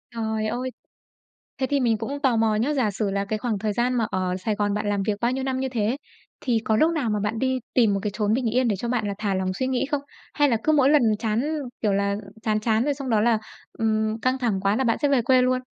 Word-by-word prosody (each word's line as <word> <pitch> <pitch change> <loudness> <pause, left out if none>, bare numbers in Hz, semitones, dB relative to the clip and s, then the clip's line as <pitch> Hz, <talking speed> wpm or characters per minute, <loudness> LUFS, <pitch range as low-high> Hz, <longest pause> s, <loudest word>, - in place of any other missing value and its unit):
Trời 220 -1 -1
ơi! 250 +3 -2 0.9
Thế 260 - 0
thì 280 +1 +1
mình 230 -4 +2
cũng 280 +6 -4
tò 260 -5 +3
mò 225 -1 +2
nhé, 245 +8 +1
giả 245 -7 +1
sử 200 0 -2
là 200 0 -1
cái 215 +2 -2
khoảng 220 -3 -2
thời 210 -1 -1
gian 245 +3 +1
mà 235 -3 +1
ở 185 -1 -1
Sài 210 +3 -2
Gòn 205 -1 0
bạn 210 0 -2
làm 200 -1 0
việc 210 +1 0
bao 235 +1 +2
nhiêu 265 +1 -2
năm 260 -1 -1
như 265 - -1
thế 235 +1 0 0.4
thì 235 -4 +1
có 220 - +2
lúc 315 +7 +4
nào 290 -9 -1
mà 210 - 0
bạn 210 +2 -2
đi 260 0 0
tìm 225 -5 +4
một 195 - 0
cái 210 - -1
chốn 210 0 0
bình 250 +2 0
yên 255 -1 +3
để 210 - +1
cho 235 +5 -4
bạn 235 -3 0
là 200 - -2
thả 210 -2 -1
lòng 185 0 -1
suy 260 +7 -2
nghĩ 260 0 0
không? 290 -2 0 0.3
Hay 290 -2 +3
là 230 - +2
cứ 310 - +3
mỗi 280 -3 +4
lần 300 -1 +5 0.2
chán, 220 +1 0 0.4
kiểu 210 -3 +2
là, 200 0 +1 0.3
chán 215 -1 +1
chán 220 +1 +1
rồi 290 +2 +1
xong 275 -2 -6
đó 220 -2 +3
là, 230 0 +3 0.4
ừm, 220 0 0
căng 255 +1 +1
thẳng 225 -7 0
quá 200 +1 +2
là 265 - +1
bạn 230 -3 +2
sẽ 290 - +3
về 270 -3 +3
quê 255 +2 +4
luôn? 255 0 +2
225 Hz, 280 wpm, -24 LUFS, 210-255 Hz, 0.9 s, lần